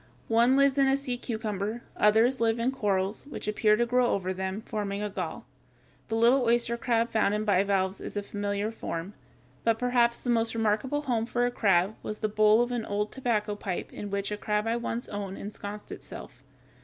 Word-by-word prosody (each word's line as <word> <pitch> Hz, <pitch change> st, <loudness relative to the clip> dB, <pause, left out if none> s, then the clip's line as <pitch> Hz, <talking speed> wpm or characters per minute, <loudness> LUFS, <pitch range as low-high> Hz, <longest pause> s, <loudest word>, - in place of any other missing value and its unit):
One 235 Hz, +4 st, +4 dB
lives 275 Hz, 0 st, +4 dB
in 270 Hz, -, +5 dB
the 270 Hz, -, +4 dB
sea 275 Hz, -3 st, -2 dB
cucumber; 220 Hz, -2 st, -3 dB
others 225 Hz, +4 st, +3 dB
live 225 Hz, 0 st, +2 dB
in 235 Hz, +3 st, +1 dB
corals, 200 Hz, -2 st, -1 dB
which 290 Hz, -, -7 dB
appear 210 Hz, 0 st, +3 dB
to 240 Hz, +2 st, +1 dB
grow 250 Hz, +1 st, +2 dB
over 190 Hz, -4 st, -1 dB
them, 190 Hz, +3 st, -4 dB
forming 205 Hz, -2 st, -3 dB
a 210 Hz, -, -3 dB
gall -, -, -5 dB, 0.6 s
(Fig. -, -, -3 dB
151). -, -, +1 dB
The -, -, 0 dB
little 250 Hz, +2 st, +5 dB
oyster 235 Hz, 0 st, +1 dB
crab 235 Hz, 0 st, 0 dB
found 210 Hz, -2 st, +2 dB
in 215 Hz, 0 st, -2 dB
bivalves 195 Hz, -1 st, +1 dB
is -, -, -6 dB
a 205 Hz, -, -1 dB
familiar 205 Hz, +1 st, -2 dB
form. 180 Hz, -3 st, -5 dB, 0.5 s
But 230 Hz, -1 st, +2 dB
perhaps 240 Hz, -1 st, +2 dB
the 245 Hz, -, +1 dB
most 230 Hz, -1 st, +1 dB
remarkable 225 Hz, +7 st, 0 dB
home 230 Hz, -4 st, 0 dB
for 245 Hz, 0 st, +1 dB
a 245 Hz, -, 0 dB
crab 195 Hz, -3 st, +2 dB
was 215 Hz, -, -6 dB
the 215 Hz, -, +1 dB
bowl 215 Hz, +2 st, +5 dB
of 245 Hz, -, -4 dB
an 240 Hz, -2 st, -1 dB
old 210 Hz, +1 st, -1 dB
tobacco 225 Hz, -5 st, -1 dB
pipe 190 Hz, -3 st, -5 dB
in 205 Hz, -, -6 dB
which 200 Hz, +1 st, -2 dB
a 210 Hz, -, -2 dB
crab 210 Hz, 0 st, -1 dB
I 225 Hz, +1 st, +1 dB
once 235 Hz, 0 st, -3 dB
owned 200 Hz, -2 st, -5 dB
ensconced 205 Hz, 0 st, -7 dB
itself. -, -, -10 dB
220 Hz, 205 wpm, -28 LUFS, 205-240 Hz, 0.6 s, in